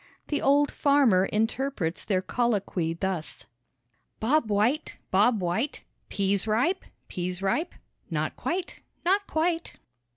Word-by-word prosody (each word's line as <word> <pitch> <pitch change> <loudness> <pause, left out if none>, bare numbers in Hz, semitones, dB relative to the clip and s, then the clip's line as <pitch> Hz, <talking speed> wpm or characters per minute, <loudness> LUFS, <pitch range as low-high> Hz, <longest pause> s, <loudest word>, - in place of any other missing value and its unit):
The 295 - 0
old 285 +1 +4
farmer 270 -10 +4
interprets 220 -4 -1
their 190 -3 0
colloquy 200 -8 0
thus: 185 -2 -3 0.7
"Bob 255 +1 +2
White, 220 +9 +1 0.2
Bob 210 +4 +4
White, 180 +11 -1 0.3
Pease 200 +1 +1
ripe, 250 - +1 0.2
pease 180 +1 -4
ripe?" 300 - 0 0.3
"Not - - -2
quite, 360 +1 -3 0.2
not 400 +3 +2
quite." 330 +1 -1
220 Hz, 110 wpm, -27 LUFS, 190-290 Hz, 0.7 s, old